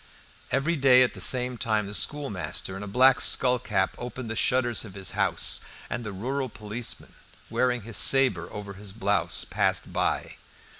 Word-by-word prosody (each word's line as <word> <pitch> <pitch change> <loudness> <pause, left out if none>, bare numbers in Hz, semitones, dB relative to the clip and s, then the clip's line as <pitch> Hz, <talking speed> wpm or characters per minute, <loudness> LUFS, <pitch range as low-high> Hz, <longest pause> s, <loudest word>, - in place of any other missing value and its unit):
Every 140 +6 0
day 130 -2 +6
at 125 - -1
the - - -8
same 125 -1 +2
time 110 -2 0
the 100 - -7
schoolmaster 105 -8 -3
in 95 - -7
a 105 - -6
black 125 +4 +4
skullcap 115 -7 +1
opened 120 -1 -6
the - - -4
shutters 120 0 +1
of 105 -4 -11
his 95 -1 -5
house, - - +1 0.3
and 120 - -3
the 105 - -6
rural 130 +7 -3
policeman, 110 +2 -4 0.4
wearing 125 -3 0
his 115 0 -4
sabre 125 -11 +5
over 100 -1 -7
his 100 0 -9
blouse, 105 -1 0
passed - - -1
by. - - -2
115 Hz, 165 wpm, -26 LUFS, 105-130 Hz, 0.4 s, day